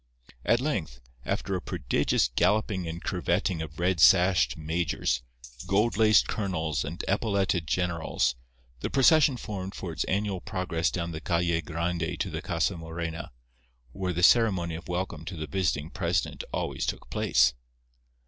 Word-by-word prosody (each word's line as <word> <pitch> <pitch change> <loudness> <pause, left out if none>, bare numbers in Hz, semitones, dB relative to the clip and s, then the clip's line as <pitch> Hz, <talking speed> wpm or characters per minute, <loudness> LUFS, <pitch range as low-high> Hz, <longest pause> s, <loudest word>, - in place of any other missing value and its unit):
At 120 - +3
length, 95 - -2 0.3
after - - -2
a - - -2
prodigious - - +1
galloping 105 -4 +1
and 80 +1 -6
curvetting 90 -2 0
of 80 -1 -7
red 90 0 +1
sashed 90 +1 +5
majors, 80 -6 -1 0.5
gold 105 +3 +2
laced 110 -1 +5
colonels 80 - -1
and 80 +3 -5
epauletted 100 -5 0
generals, 85 -4 0 0.5
the - - -3
procession 140 0 +5
formed 95 -4 -6
for 90 - -5
its 80 - -2
annual 100 -2 -1
progress 90 -3 -1
down 85 -1 -3
the 80 -1 -6
Calle 85 -1 +1
Grande 85 +2 -2
to 95 - -2
the 80 0 -4
Casa 85 +1 0
Morena, 80 0 -5 0.6
where 90 +6 -3
the 90 0 -2
ceremony 95 -6 +4
of 80 0 -7
welcome 90 -3 -3
to 90 0 -7
the 80 - -4
visiting 75 -1 -1
president 85 -4 -1
always - - -2
took - - -4
place. - - +3
85 Hz, 150 wpm, -28 LUFS, 80-95 Hz, 0.6 s, sashed